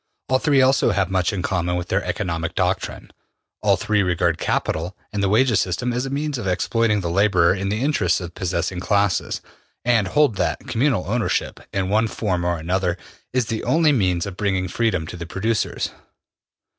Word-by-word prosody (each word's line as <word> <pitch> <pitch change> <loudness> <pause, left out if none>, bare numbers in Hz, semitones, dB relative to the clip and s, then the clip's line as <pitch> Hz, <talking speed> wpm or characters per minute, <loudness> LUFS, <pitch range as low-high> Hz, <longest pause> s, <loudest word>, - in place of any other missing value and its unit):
All 130 0 +3
three 140 -3 +4
also 135 +1 +4
have 95 0 0
much 95 -2 +1
in 95 -3 -3
common 90 -2 0
in 90 - -2
their - - 0
economic 85 -1 -3
doctrine. 90 0 -2 0.5
All - - +3
three 105 -1 +1
regard 85 -3 +1
capital 85 +4 -1 0.2
and 105 - -1
the 100 - +2
wages 115 +1 +3
system 110 +7 -1
as 125 +2 -1
a - - -4
means 145 -1 -2
of 105 - -4
exploiting 105 +3 +1
the 85 - -3
laborer 95 -2 +4
in 100 0 -2
the 105 +5 -1
interests 105 - +2
of 90 -3 -6
the - - -14
possessing 90 0 -1
classes, 100 0 0 0.4
and 115 -5 +3
hold 140 -1 +2
that - - 0
communal 120 -5 0
ownership, 115 +3 -1
in 95 -1 -1
one 110 +3 +2
form 95 -5 -2
or 85 0 0
another, 90 +2 -1 0.3
is 125 -2 +1
the 110 0 -3
only 160 -1 +3
means 90 -9 +1
of 100 -2 -7
bringing 95 -3 0
freedom 90 -4 0
to 80 - -7
the 85 -1 -7
producers. 110 +5 -1
100 Hz, 190 wpm, -22 LUFS, 90-115 Hz, 0.5 s, three